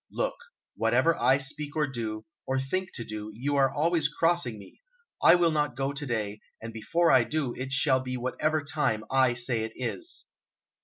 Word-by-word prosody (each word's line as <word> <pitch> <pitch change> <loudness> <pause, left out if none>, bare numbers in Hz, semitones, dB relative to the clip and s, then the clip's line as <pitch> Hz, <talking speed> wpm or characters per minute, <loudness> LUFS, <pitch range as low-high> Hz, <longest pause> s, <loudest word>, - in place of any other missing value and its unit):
"Look, - - -1 0.4
whatever 165 0 +3
I 130 +2 +4
speak 145 +2 -4
or 155 -1 +2
do, 110 -5 -5 0.2
or 130 0 +1
think 185 +8 -2
to 115 - -3
do, 105 0 -6
you 140 +5 -1
are 135 -1 +4
always 160 0 +1
crossing 165 -7 +1
me! 100 - -15 0.4
I 170 - +8
will 175 -2 +3
not 150 -4 0
go 135 +2 -1
to 145 +1 -4
day, 105 -3 -2 0.2
and 115 0 -8
before 165 +10 +2
I 130 -2 +6
do, 135 0 -2
it 130 +1 -6
shall 135 -1 +3
be 130 0 -4
whatever 150 +5 -1
time 145 -8 0
I 130 -2 +4
say 120 -1 0
it 110 0 -4
is." 335 - -3
135 Hz, 190 wpm, -28 LUFS, 120-155 Hz, 0.4 s, I